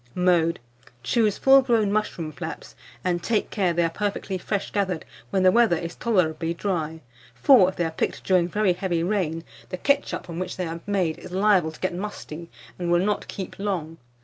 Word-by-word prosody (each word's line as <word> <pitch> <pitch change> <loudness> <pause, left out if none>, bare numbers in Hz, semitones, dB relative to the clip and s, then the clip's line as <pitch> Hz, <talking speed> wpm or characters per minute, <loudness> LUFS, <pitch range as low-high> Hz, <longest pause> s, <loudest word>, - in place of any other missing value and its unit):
Mode. 175 -2 +2 0.4
Choose 215 - +2
full 270 0 +6
grown 230 -6 +2
mushroom 175 -7 -2
flaps, 125 - -7 0.3
and 175 -1 0
take 220 +3 0
care 190 -5 +1
they 170 0 +1
are 165 - +2
perfectly 200 0 -3
fresh 200 +2 -3
gathered 190 -5 -1 0.2
when 190 +5 +1
the 185 - +6
weather 230 -4 +4
is 170 0 -5
tolerably 170 -7 0
dry; 160 -4 -2 0.3
for, 245 -10 +6
if 190 - -8
they 175 - 0
are 165 - -2
picked - - -2
during 180 -2 +3
very 205 0 +2
heavy 175 -2 -1
rain, 170 -4 -1 0.3
the 185 - -4
ketchup 280 +8 0
from 170 -1 -6
which 185 - -4
they 180 - -2
are 165 0 -5
made 185 -6 0
is - - -10
liable 190 -4 +3
to 155 - -15
get 185 - -1
musty, 175 -4 -6 0.3
and 175 -1 -1
will 175 +2 +3
not 210 0 -1
keep 190 -1 -7
long. 170 -6 -3
180 Hz, 195 wpm, -24 LUFS, 170-205 Hz, 0.4 s, full